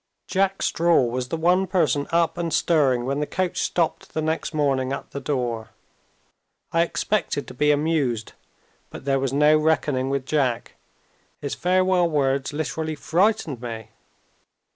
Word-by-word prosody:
Jack 195 0 0
Straw 170 -4 +3
was 125 +1 -2
the 165 - -3
one 180 +4 +2
person 155 -6 +1
up 170 0 +2
and 170 -1 -3
stirring 135 -9 +2
when 140 +2 -1
the 150 - -1
coach 185 -1 -2
stopped 170 -2 -1
the 155 - 0
next 160 +1 -1
morning 135 -4 0
at 140 - -5
the 140 - -5
door. 125 -5 -2 1.0
I 165 - +3
expected 170 -3 -1
to - - -9
be 150 - +1
amused 145 -7 0 0.6
but - - -10
there 135 -1 +2
was 135 -1 -1
no 150 +2 +4
reckoning 150 -4 +1
with 135 -1 -1
Jack. 135 -6 -1 0.7
His 140 - -4
farewell 185 -1 +2
words 140 -3 0
literally 155 +1 -3
frightened 170 - 0
me. 110 -2 -7
150 Hz, 150 wpm, -23 LUFS, 135-170 Hz, 1.0 s, no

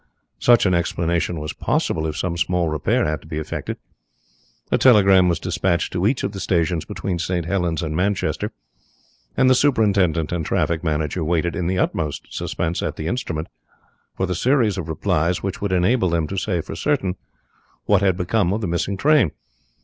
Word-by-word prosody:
Such 120 -3 +5
an 95 - +3
explanation 85 -1 0
was 75 0 -5
possible 80 -1 -1
if 80 0 -4
some 85 -1 -2
small 85 +1 0
repair 75 -2 +1
had 75 0 -2
to - - -16
be 75 - -5
effected. 80 - -4 0.9
A - - +3
telegram 95 -7 +6
was 85 - +1
dispatched 90 -2 -1
to 90 +2 +1
each 125 +2 0
of 100 - -1
the 100 - -7
stations 85 -3 0
between 90 -3 -4
St. 85 0 -1
Helens 85 -2 -1
and 80 -1 -3
Manchester, 95 +2 -1 0.9
and 130 - +4
the 130 - +6
superintendent 100 - +2
and 85 -2 -1
traffic 80 +2 0
manager 80 +1 -1
waited 85 +1 0
in 85 - -2
the 95 +1 0
utmost 80 -5 -2
suspense 80 +2 -2
at - - -3
the 80 - -6
instrument 80 -7 -3 0.7
for 95 - +1
the 90 - -2
series 115 +1 +2
of 85 -2 -5
replies 80 +2 0
which 95 0 -4
would 100 -2 -1
enable 95 +3 +2
them 85 -1 0
to 95 - -5
say 90 -3 -1
for - - -8
certain 130 -12 0 0.7
what 100 -2 +3
had 95 -3 +2
become 90 +1 +1
of 110 - -2
the 100 - -2
missing 85 +3 -1
train. 145 - +4
90 Hz, 185 wpm, -21 LUFS, 80-100 Hz, 0.9 s, telegram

